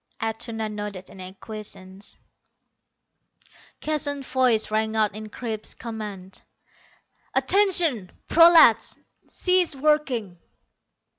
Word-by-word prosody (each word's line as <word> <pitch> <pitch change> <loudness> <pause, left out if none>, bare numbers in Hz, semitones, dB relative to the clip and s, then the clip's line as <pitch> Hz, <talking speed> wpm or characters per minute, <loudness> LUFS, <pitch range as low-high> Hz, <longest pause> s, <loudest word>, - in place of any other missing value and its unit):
Atuna 225 0 -4
nodded 205 -3 -7
in 190 - -11
acquiescence. 190 0 -9 1.6
Keston's 285 -3 -2
voice 250 -5 +2
rang 220 0 -1
out 215 -2 +1
in 215 +1 -8
crisp 220 -1 -3
command. 210 -5 -8 0.9
"Attention, 340 - +2 0.2
prolats. 330 -8 +6 0.3
Cease 365 -4 +1
working." 265 - 0
220 Hz, 80 wpm, -24 LUFS, 210-285 Hz, 1.6 s, prolats